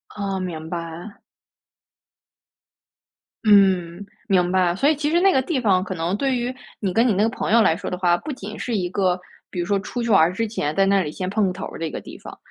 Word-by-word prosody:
哦， 200 -2 -3
明 165 -4 -5
白。 170 +3 -7 2.2
嗯， 190 -3 +3 0.2
明 180 -3 +2
白， 180 -2 +2
所 275 +9 +1
以 310 - +4
其 295 +1 -1
实 335 +2 +3
那 385 +1 +4
个 265 - +3
地 275 +1 -1
方 195 -6 +2
可 190 -1 -5
能 170 +3 -1
对 265 +3 0
于 245 +1 -2 0.3
你 195 -4 -2
跟 230 +5 +3
你 225 - +3
那 195 +2 +2
个 225 - +3
朋 230 - -3
友 230 - +6
来 160 -7 +4
说 - - -5
的 180 - -4
话， 175 -1 +3
不 300 - -6
仅 215 -5 -7
是 240 - -2
一 180 -2 -1
个， 185 -2 +1 0.3
比 180 - -6
如 175 - -1
说 200 +1 +1
出 240 +5 -4
去 235 - -2
玩 165 -3 +5
之 225 +5 -2
前 155 -8 -3
在 195 - +3
那 195 0 +3
里 150 -4 -3
先 185 +3 -4
碰 200 +1 +1
个 185 - -2
头 190 - -6
儿 - - -9
的 165 - -2
一 - - -4
个 - - -5
地 - - -11
方， - - -11
195 Hz, 265 characters per minute, -22 LUFS, 180-225 Hz, 2.2 s, 友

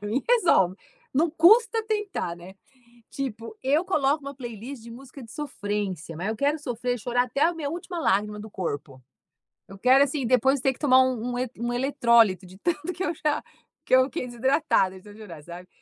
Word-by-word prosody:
pra 205 - -5
mim 250 +6 0
resolve, 335 - +4 0.4
não 315 +5 +2
custa 445 +8 +5
tentar, 415 - -2
né, 180 +2 -12 0.6
tipo 255 - -6
eu 295 +6 +2
coloco 300 -5 +1
uma 280 0 -6
playlist 240 0 -8
de 235 - -11
música 260 +3 -11
de 225 - -12
sofrência, 205 - -4
mas 175 +5 -3
eu 220 - -2
quero 290 +4 +1
sofrer 245 -3 -3
e - - -9
chorar 245 +2 0
até 255 +3 -4
a 345 +2 +3
minha 295 -3 -4
última 345 +1 -6
lágrima 210 -4 0
do 215 +1 -10
corpo. 145 -8 -5 0.7
Eu 195 - -11
quero 260 +6 +5
assim, 280 -1 -3
depois 260 +3 +3
ter 265 +1 +2
que - - -20
tomar 260 -3 +5
um 250 -2 -1
um - - -3
e 255 0 -1
um 240 +1 -2
eletrólito 235 -7 +3
de 185 - -14
tanto 330 +2 -2
que 375 - -3
eu 340 - 0
já 300 -1 -1 0.4
que - - +3
eu 260 - +5
fiquei 255 -1 -5
desidratada 240 - +1
de - - -19
tanto 205 0 -13
chorar, 175 -8 -10
sabe. 175 +2 -10
250 Hz, 205 wpm, -25 LUFS, 210-290 Hz, 0.7 s, custa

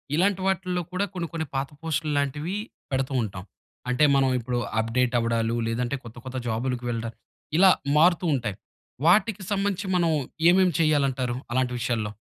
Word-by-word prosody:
ఇలాంటి 190 +3 +2
వాటిల్లో 185 -1 0
కూడా 185 +2 0
కొన్ని, 175 -2 -3
కొన్ని 160 -1 -2
పాత 135 +1 -1
పోస్ట్‌లు 160 -1 -1
లాంటివి 150 +6 -1 0.4
పెడుతూ 135 0 -1
ఉంటాం. 95 -4 -5 0.5
అంటే, 125 +4 +2
మనం 135 -1 +3
ఇప్పుడు 120 +1 -2 0.2
అప్‌డేట్ 120 +3 +1
అవ్వడాలు 115 0 0
లేదంటే 120 +3 -1
కొత్త, 115 0 -11
కొత్త 130 0 -5
జాబులకి 120 +2 -2
వెళ్ళడం 115 -1 -3 0.4
ఇలా 190 +2 +7 0.3
మారుతూ 175 +3 +4
ఉంటాయి. 120 -7 -2 0.5
వాటికి 205 +2 +3
సంబంధించి 200 0 0
మనం 170 -2 +3 0.4
ఏమేం 185 +1 +5
చేయాలంటారు? 135 -6 +1 0.2
అలాంటి 125 0 +1
విషయాల్లో. 115 -3 -1
135 Hz, 145 wpm, -25 LUFS, 120-175 Hz, 0.5 s, ఇలా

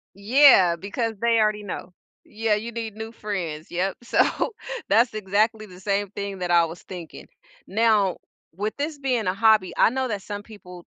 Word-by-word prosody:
Yeah, 200 -4 +6
because 220 +5 -3
they 230 -1 +3
already 215 -1 +1
know. 185 -2 -7 0.3
Yeah, 220 0 0
you 220 +3 -5
need 225 -2 -5
new 220 +1 -7
friends. 180 -9 -5
Yep. 185 +3 -1
So 240 - +2 0.7
that's 235 +1 +4
exactly 215 +2 0
the 180 -3 -14
same 200 +1 -1
thing 200 -1 -5
that 180 -1 -2
I 170 -1 +5
was 165 +1 -9
thinking. 175 -3 -10 0.4
Now, 210 -4 +2 0.4
with 210 +4 -2
this 295 +1 -3
being 250 -6 -1
a 185 - +1
hobby, 215 -2 +3
I - - +5
know 260 +2 -2
that 205 -3 -3
some 205 0 -6
people, 180 -5 -13
210 Hz, 175 wpm, -24 LUFS, 185-225 Hz, 0.7 s, Yeah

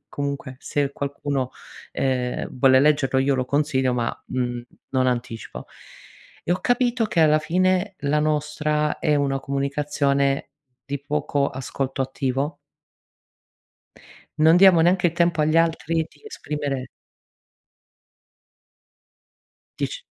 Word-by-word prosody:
comunque 140 -2 -4
se 140 -1 -1
qualcuno, 140 -2 -3 0.4
ehm, 125 -2 -1
vuole 130 0 +5
leggerlo 145 -3 +3
io 135 +1 +2
lo 130 -1 0
consiglio 135 -3 +1
ma, 120 -1 -3
mhmm, 120 -1 -2 0.3
non 130 -1 +1
anticipo. 120 -2 -4 0.8
E 175 - +1
ho 185 - -1
capito 245 -1 +1
che 170 -6 0
alla 155 -1 +5
fine 185 +4 +1
la 150 +1 +1
nostra 150 0 0
è 150 -2 +1
una 135 -1 0
comunicazione 140 0 0 0.3
di 140 +1 -4
poco 145 -1 -1
ascolto 135 0 -3
attivo. 135 +3 -2 1.8
Non 160 +2 +6
diamo 185 -3 +7
neanche 175 +1 +3
i - - -8
tempo 170 -2 +1
agli 155 +2 +2
altri 165 0 +1
di - - -24
esprimere 145 - -4 2.9
Dic - - -3
145 Hz, 115 wpm, -23 LUFS, 135-155 Hz, 2.9 s, diamo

